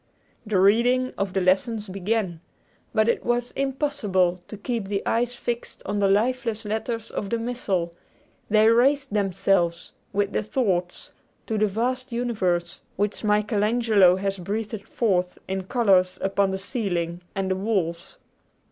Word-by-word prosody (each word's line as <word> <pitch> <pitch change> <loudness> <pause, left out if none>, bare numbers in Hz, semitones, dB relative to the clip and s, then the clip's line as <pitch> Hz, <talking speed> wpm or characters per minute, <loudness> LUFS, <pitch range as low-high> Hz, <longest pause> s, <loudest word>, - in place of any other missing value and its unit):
The 205 -3 +2
reading 245 +6 +3
of 195 -2 -2
the 190 - +1
lessons 205 +4 +1
began. 190 -2 -2 0.5
But 220 0 +2
it 235 - +1
was 240 0 0
impossible 255 - 0
to 210 - -8
keep 225 -1 -3
the 200 0 -2
eyes 240 +2 0
fixed 240 0 -4
on 205 +1 -1
the 200 - +3
lifeless 225 +2 +1
letters 220 +2 -3
of 200 - -4
the 235 - 0
Missal 200 -8 -2 0.6
they 215 +1 +5
raised 270 +2 +3
themselves, 190 -4 +1 0.2
with 205 0 0
the - - +1
thoughts, 195 -6 -1 0.3
to 220 -1 -1
the 215 - +3
vast 250 +5 -2
universe 185 -8 -1
which 205 +3 -1
Michael 210 0 +1
Angelo 215 -5 +4
has 195 0 -2
breathed 210 +3 -4
forth 180 -6 0
in 190 0 -3
colors 190 -5 +3
upon 195 0 +1
the 190 - -2
ceiling 180 -5 -3
and 190 -1 -1
the - - +2
walls. 185 -4 -2
205 Hz, 150 wpm, -25 LUFS, 190-235 Hz, 0.6 s, they